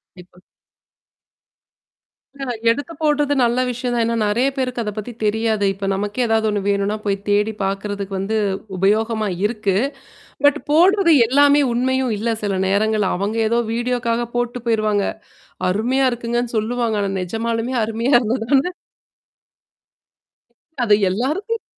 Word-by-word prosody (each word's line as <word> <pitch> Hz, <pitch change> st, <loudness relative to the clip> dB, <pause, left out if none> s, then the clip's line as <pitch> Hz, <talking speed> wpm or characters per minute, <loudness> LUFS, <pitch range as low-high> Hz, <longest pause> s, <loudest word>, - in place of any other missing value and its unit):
கண்டிப்பா. 180 Hz, 0 st, -16 dB, 2.0 s
ஆ -, -, -1 dB, 0.3 s
எடுத்து 285 Hz, +8 st, -2 dB
போட்டது 295 Hz, -1 st, +2 dB
நல்ல 240 Hz, +1 st, +2 dB
விஷயம் 245 Hz, 0 st, -3 dB
தான். 235 Hz, -, +1 dB
ஏன்னா 230 Hz, 0 st, 0 dB
நெறைய 240 Hz, +6 st, +2 dB
பேருக்கு 255 Hz, -2 st, -2 dB
அத 210 Hz, -, -3 dB
பத்தி 215 Hz, +3 st, -5 dB
தெரியாது. 220 Hz, 0 st, +1 dB
இப்ப 195 Hz, 0 st, -5 dB
நமக்கே 205 Hz, +5 st, -1 dB
ஏதாவது 220 Hz, -1 st, +1 dB
ஒண்ணு 205 Hz, -1 st, -1 dB
வேணுனா 200 Hz, +1 st, 0 dB
போய் 200 Hz, -1 st, +1 dB
தேடி 210 Hz, +2 st, +2 dB
பார்கறதுக்கு 195 Hz, 0 st, -3 dB
வந்து 200 Hz, +3 st, -2 dB, 0.4 s
உபயோகமா 215 Hz, +3 st, +1 dB, 0.2 s
இருக்கு. 210 Hz, -3 st, 0 dB, 0.7 s
பட் 290 Hz, +1 st, +4 dB
போடுறது 350 Hz, +3 st, +5 dB
எல்லாமே 285 Hz, +3 st, +5 dB
உண்மையும் 255 Hz, 0 st, 0 dB
இல்ல 225 Hz, +3 st, -1 dB
சில 205 Hz, -2 st, -1 dB
நேரங்கள் 210 Hz, +1 st, +1 dB
அவங்க 200 Hz, +5 st, -2 dB
ஏதோ 235 Hz, +2 st, +1 dB
வீடியோக்காக 240 Hz, 0 st, -1 dB
போட்டு 240 Hz, 0 st, -1 dB
போயிருவாங்க. 215 Hz, -3 st, +1 dB, 0.7 s
அருமையா 250 Hz, +8 st, +1 dB
இருக்குங்கன்னு 240 Hz, 0 st, -2 dB
சொல்லுவாங்க. 230 Hz, 0 st, -1 dB
ஆனா 200 Hz, -1 st, -1 dB
நெஜமாலுமே 230 Hz, +6 st, -2 dB
அருமையா 230 Hz, +5 st, -1 dB
இருந்தா 240 Hz, +1 st, -1 dB
தானே 285 Hz, +6 st, +3 dB, 2.1 s
அது 210 Hz, -, +5 dB, 0.2 s
எல்லாருக்கும் 315 Hz, -, -2 dB
230 Hz, 125 wpm, -20 LUFS, 210-250 Hz, 2.1 s, போடுறது